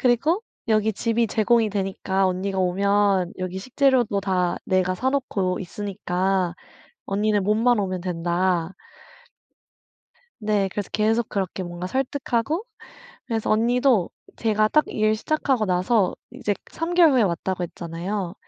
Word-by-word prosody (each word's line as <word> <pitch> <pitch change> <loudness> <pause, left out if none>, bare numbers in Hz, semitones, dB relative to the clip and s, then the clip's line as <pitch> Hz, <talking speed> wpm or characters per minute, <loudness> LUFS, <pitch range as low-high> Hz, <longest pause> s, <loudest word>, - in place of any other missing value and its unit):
그리고 280 - +2 0.3
"여기 215 0 +2
집이 230 +2 +1
제공이 225 +1 +2
되니까 195 -1 -1
언니가 190 +1 -2
오면 195 0 +2
여기 185 0 -4
식재료도 255 -2 +2
다 185 -2 0
내가 185 -1 +1
사놓고 215 -6 -1
있으니까 190 -2 -1 0.5
언니는 205 0 +1
몸만 225 +3 +3
오면 185 -2 -2
된다." 175 0 0 1.7
네. 210 -3 +1
그래서 205 -2 -4
계속 220 +2 +1
그렇게 190 -1 -3
뭔가 175 0 -5
설득하고, 270 - -1 0.6
그래서 225 -3 -2
언니도 235 -2 +3 0.3
제가 215 -1 +2
딱 305 +5 +3
일 215 0 +1
시작하고 265 0 0
나서 185 +2 +2 0.2
이제 240 -5 -2 0.2
3 330 +2 -3
개월 335 -5 +6
후에 250 - +4
왔다고 185 -1 -1
했잖아요. 175 +3 -4
205 Hz, 285 characters per minute, -23 LUFS, 185-235 Hz, 1.7 s, 개월